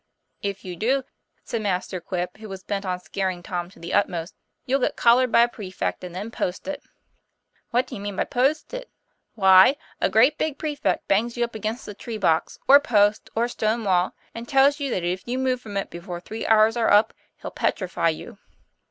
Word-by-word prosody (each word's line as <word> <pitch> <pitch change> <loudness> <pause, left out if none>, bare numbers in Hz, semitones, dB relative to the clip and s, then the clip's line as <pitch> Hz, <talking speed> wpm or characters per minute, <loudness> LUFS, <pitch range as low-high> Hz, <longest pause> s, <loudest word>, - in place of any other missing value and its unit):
'If 200 -1 -4
you 180 -1 -5
do," 260 +8 +1 0.4
said 230 - -3
Master 185 -2 -2
Quip, 180 0 -4
who 215 -1 -10
was 190 -1 -8
bent 200 0 -3
on 180 -1 -1
scaring 185 -1 -3
Tom 175 -1 -4
to - - -19
the 170 +2 -7
utmost, 175 -4 0 0.3
"you'll 270 +2 +1
get - - 0
collared 245 +1 +4
by 235 - +6
a 235 - +5
prefect 195 -6 -5
and 180 -1 -7
then 205 +5 -5
posted." 280 +10 -4 0.9
'What 245 +2 +1
do - - -12
you 200 - -6
mean 205 -1 -4
by - - +1
'posted' 310 - -1 0.2
?" - - -47
' - - -52
Why, 190 +4 +7 0.3
a - - +3
great 245 +9 +4
big 305 -3 -1
prefect 300 -1 -2
bangs 230 +5 +1
you 240 - +1
up 235 - -3
against 220 +3 -4
a 210 - -6
tree 225 +2 -6
box, 160 -6 +1
or 280 - +10
a - - -1
post, 210 -4 +2
or 230 - +2
a 240 - 0
stonewall; 215 -6 0 0.2
and 230 +1 -7
tells 275 +2 +4
you 280 -1 -2
that 185 -7 -2
if 180 +2 -1
you 245 +2 -2
move 260 -1 0
from 205 -4 -6
it 195 - -3
before 175 +1 -7
three 220 +5 -6
hours 220 +1 +5
are 235 -2 +2
up 210 +2 +5 0.3
he'll - - -7
petrify 180 -3 0
you." 160 - -6
215 Hz, 215 wpm, -24 LUFS, 185-245 Hz, 0.9 s, or